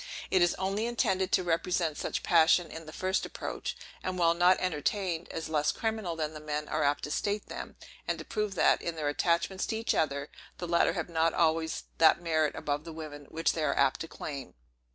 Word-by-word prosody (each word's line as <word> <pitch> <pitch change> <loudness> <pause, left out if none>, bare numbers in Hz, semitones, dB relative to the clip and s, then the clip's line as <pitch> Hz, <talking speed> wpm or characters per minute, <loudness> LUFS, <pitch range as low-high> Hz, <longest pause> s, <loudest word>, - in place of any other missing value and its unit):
It 185 - +4
is 175 0 +4
only 195 +4 -1
intended 190 -5 +1
to 185 - +4
represent 170 -1 0
such - - -3
passions 170 0 +4
in 160 0 -8
the - - -7
first 185 +3 0
approach; - - -5 0.2
and, 185 0 -3
while 170 -1 +4
not 175 +2 +5
entertained, 175 +1 -1
as 165 - -4
less 150 -2 +1
criminal 220 -6 -2
than 155 -1 -2
the 155 - -7
men 150 0 -3
are 155 - -1
apt 145 0 +1
to 150 - -4
state 205 +5 -1
them; - - -7 0.3
and - - 0
to - - -8
prove 210 -2 -2
that, - - +4
in 170 - -3
their 150 -2 -1
attachments 170 +5 0
to - - -1
each 225 - 0
other, 140 -2 -1 0.3
the 175 - -5
latter 170 0 +3
have 175 -4 -3
not 165 -1 +1
always 160 -1 +1 0.2
that 165 +1 +6
merit 160 -3 +1
above 145 0 -2
the 165 - -8
women, 150 -2 -8
which 165 +4 0
they 160 - -2
are 140 -2 +1
apt 130 - +3
to 165 - -4
claim. 140 -5 -7
165 Hz, 215 wpm, -30 LUFS, 155-185 Hz, 0.3 s, that